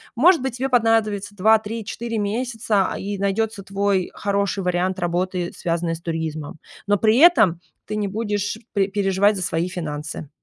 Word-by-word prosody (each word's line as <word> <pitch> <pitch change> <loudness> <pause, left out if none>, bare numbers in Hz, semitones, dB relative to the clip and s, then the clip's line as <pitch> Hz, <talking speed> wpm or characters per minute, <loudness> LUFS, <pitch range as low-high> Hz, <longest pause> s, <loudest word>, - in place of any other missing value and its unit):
Может 330 +6 +5
быть, 260 -2 -3
тебе 265 +2 -1
понадобится 220 -4 +1
2-3-4 220 +2 0
месяца, 215 -1 0
а, - - -5
и 200 0 -4
найдётся 200 +1 -1
твой 195 -1 0
хороший 200 -1 -1
вариант 180 +1 0
работы, 175 0 -1
связанной 170 -1 -1
с 165 - -11
туризмом. 160 -3 -4 0.3
Но 205 - +3
при 220 +3 +3
этом 240 - +6 0.3
ты 215 - -4
не 210 -1 -1
будешь 205 0 -2 0.2
пере 200 -2 +2
переживать 200 +1 +2
за 185 - -3
свои 170 0 -1
финансы. 155 -4 -5
200 Hz, 155 wpm, -22 LUFS, 180-220 Hz, 0.3 s, этом